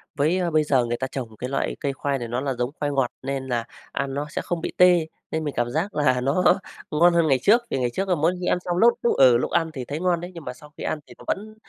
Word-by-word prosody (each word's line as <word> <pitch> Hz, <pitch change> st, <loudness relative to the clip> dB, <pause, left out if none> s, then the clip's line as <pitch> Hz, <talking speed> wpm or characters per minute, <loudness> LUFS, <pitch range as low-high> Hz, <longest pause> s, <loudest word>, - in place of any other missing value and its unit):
Với 170 Hz, +4 st, +1 dB
bây 155 Hz, 0 st, +3 dB
giờ 130 Hz, -5 st, +2 dB
người 120 Hz, 0 st, -2 dB
ta 130 Hz, -, -2 dB
trồng 115 Hz, -5 st, -6 dB
cái 125 Hz, -, -4 dB
loại 135 Hz, -, -1 dB
cây 140 Hz, -1 st, -2 dB
khoai 140 Hz, 0 st, -1 dB
này 120 Hz, -, -4 dB
nó 120 Hz, +3 st, -2 dB
là 135 Hz, -2 st, -1 dB
giống 125 Hz, 0 st, -2 dB
khoai 145 Hz, -1 st, -1 dB
ngọt 135 Hz, -3 st, +1 dB
nên 135 Hz, 0 st, -3 dB
là 120 Hz, -2 st, -1 dB, 0.3 s
ăn 135 Hz, 0 st, -2 dB
nó 145 Hz, +2 st, -3 dB
sẽ -, -, -3 dB
không 170 Hz, -2 st, -3 dB
bị -, -, -3 dB
tê 175 Hz, -3 st, +5 dB, 0.2 s
nên 160 Hz, 0 st, -1 dB
mình 145 Hz, -, -3 dB
cảm 120 Hz, 0 st, +1 dB
giác 170 Hz, +8 st, -2 dB
là 130 Hz, -4 st, +2 dB
nó 155 Hz, +8 st, +4 dB, 0.4 s
ngon 170 Hz, +3 st, +5 dB
hơn 170 Hz, -2 st, +3 dB
ngày 135 Hz, -3 st, +3 dB
trước, 230 Hz, +8 st, +5 dB
vì -, -, -1 dB
ngày 125 Hz, -1 st, +1 dB
trước 195 Hz, 0 st, -2 dB
là 180 Hz, -, +3 dB
mỗi 165 Hz, +4 st, +2 dB
khi 180 Hz, -, -4 dB
ăn -, -, +2 dB
xong 175 Hz, 0 st, -1 dB
lúc 235 Hz, +4 st, +6 dB
lúc, 235 Hz, -, +2 dB
ừ, 125 Hz, -3 st, +7 dB
lúc -, -, -2 dB
ăn 165 Hz, -1 st, +1 dB
thì 130 Hz, -4 st, -5 dB
thấy 145 Hz, +4 st, -4 dB
ngon 175 Hz, -2 st, +1 dB
đấy, 175 Hz, +1 st, -7 dB
nhưng 165 Hz, -3 st, -10 dB
mà 125 Hz, -, -4 dB
sau 150 Hz, +3 st, -16 dB
khi -, -, -6 dB
ăn 155 Hz, -, -2 dB
thì -, -, -13 dB
nó -, -, -14 dB
vẫn 215 Hz, +2 st, -3 dB
145 Hz, 305 wpm, -24 LUFS, 130-175 Hz, 0.4 s, ừ